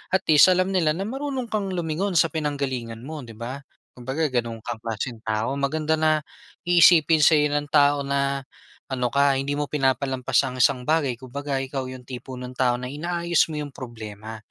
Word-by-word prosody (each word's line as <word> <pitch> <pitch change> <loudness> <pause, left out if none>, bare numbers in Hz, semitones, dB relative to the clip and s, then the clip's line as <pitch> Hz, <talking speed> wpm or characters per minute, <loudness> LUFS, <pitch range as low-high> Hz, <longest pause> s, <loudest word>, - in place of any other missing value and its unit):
at 190 - +1
least 150 - +8
alam 185 +1 +2
nila 165 -5 +2
na 190 - -3
marunong 265 +1 -4
kang 205 -3 -1
lumingon 175 +3 -2
sa 165 +1 +4
pinanggalingan 135 -7 -3
mo, 155 +2 -6
'di 115 -2 -12
ba? 120 +5 -6 0.3
Kumbaga 130 +6 -2
ganun 120 -3 -2
kang 115 -2 -5
klaseng 115 +1 -4
tao. 110 +4 -1
Maganda 155 +3 0
na 155 0 +3 0.5
iisipin 170 -2 +6
sa'yo 150 0 +5
ng 145 0 -1
tao 145 -1 +4
na 140 0 -1 0.5
ano 125 -2 -1
ka, 140 -1 +3
hindi 140 +1 -2
mo 145 0 -1
pinapalampas 135 -2 +1
ang 130 -1 -5
isang 130 0 +3
bagay 155 -4 +1
kumbaga 140 +3 -4
ikaw 135 0 -4
yung 130 0 -8
tipo 130 0 -8
ng 125 0 -7
tao 125 -2 +2
na 125 0 -6
inaayos 170 +3 0
mo - - -4
'yong 145 -2 -7
problema, 110 -3 -8
140 Hz, 180 wpm, -24 LUFS, 125-155 Hz, 0.5 s, least